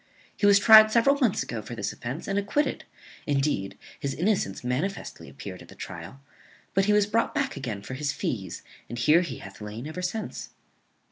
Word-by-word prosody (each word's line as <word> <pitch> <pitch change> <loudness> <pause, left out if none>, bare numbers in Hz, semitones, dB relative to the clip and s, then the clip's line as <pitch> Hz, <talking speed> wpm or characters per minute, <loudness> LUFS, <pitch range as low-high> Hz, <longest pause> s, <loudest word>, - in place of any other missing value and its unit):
He 205 - +2
was 200 0 +7
tried 215 +1 +9
several 275 +5 +4
months 240 -8 +2
ago 115 -2 -5
for 115 +3 -8
this 105 -3 -3
offence, 130 +7 -6
and 195 0 +1
acquitted; 210 +9 -1 0.4
indeed, 135 -9 0 0.2
his 140 -1 -3
innocence 180 - 0
manifestly 140 +11 -3
appeared - - -9
at - - -13
the - - -14
trial; 85 +11 -8 0.5
but 195 0 +3
he 210 - +3
was 210 -1 +4
brought 215 +3 0
back 275 -1 0
again 110 -7 -5
for 130 - -7
his 140 +2 -1
fees, 95 -11 -4 0.3
and 120 - -5
here 155 +8 +5
he 175 - -4
hath 95 +2 -11
lain 105 +4 -6
ever 155 +4 -5
since." 200 +5 -4
150 Hz, 190 wpm, -27 LUFS, -, 0.5 s, tried